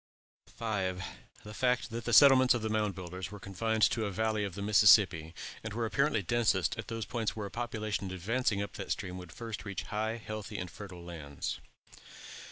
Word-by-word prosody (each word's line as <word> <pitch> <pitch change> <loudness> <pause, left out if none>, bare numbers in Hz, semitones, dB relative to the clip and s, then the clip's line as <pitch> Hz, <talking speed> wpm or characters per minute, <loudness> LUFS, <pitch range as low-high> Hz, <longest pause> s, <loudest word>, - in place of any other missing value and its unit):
5. 95 -5 -2 0.4
The 105 - -9
fact 125 +1 +1
that 115 +1 -5
the 120 - -1
settlements 130 +1 +8
of 115 - -3
the 110 - -1
Mound 105 -2 0
Builders 90 +1 -6
were 105 0 -9
confined 110 +4 -1
to 115 - +4
the 105 - 0
valley 110 +1 0
of 100 -4 -4
the 100 - -5
Mississippi, 100 -6 +5 0.3
and 110 -1 -5
were 115 0 0
apparently 140 -1 +1
densest 100 -6 +2
at - - -5
those 115 -1 -4
points 115 -3 -2
where 105 -2 -4
a 100 - -7
population 110 -4 -3
advancing 100 +3 0
up 100 - -7
that, 100 - -6
stream 90 -3 -3
would 90 -2 -10
first 115 -3 -6
reach 100 -2 -4
high, 110 +2 -2
healthy, 110 -2 -6
and 90 -2 -5
fertile 95 -4 -9
lands. 75 -5 -5
105 Hz, 190 wpm, -31 LUFS, 95-115 Hz, 0.4 s, settlements